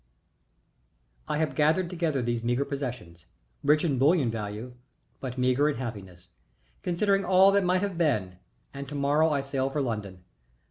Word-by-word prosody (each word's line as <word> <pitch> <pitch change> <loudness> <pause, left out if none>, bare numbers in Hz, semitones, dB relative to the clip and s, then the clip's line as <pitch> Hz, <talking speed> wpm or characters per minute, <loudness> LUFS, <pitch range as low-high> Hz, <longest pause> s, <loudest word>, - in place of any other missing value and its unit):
I - - -1
have 155 -3 0
gathered 155 +6 +2
together 165 -7 -1
these 120 -1 -2
meagre 120 +4 0
possessions 125 -13 -6 0.4
rich 150 +2 +3
in 140 -6 0
bullion 140 -3 +3
value, 110 +2 -5 0.5
but 130 -1 -6
meagre 130 +4 +2
in 145 - -1
happiness, 95 -8 -8 0.5
considering 195 +3 +1
all 190 +1 +5
that 200 0 +3
might 185 +1 +1
have 195 -4 -3
been, 105 - 0 0.3
and 140 -1 -7
to 145 - -6
morrow 145 +3 +2
I 145 -2 0
sail 135 -1 -2
for 145 - -2
London. 105 -8 -4
140 Hz, 155 wpm, -27 LUFS, 120-160 Hz, 0.5 s, all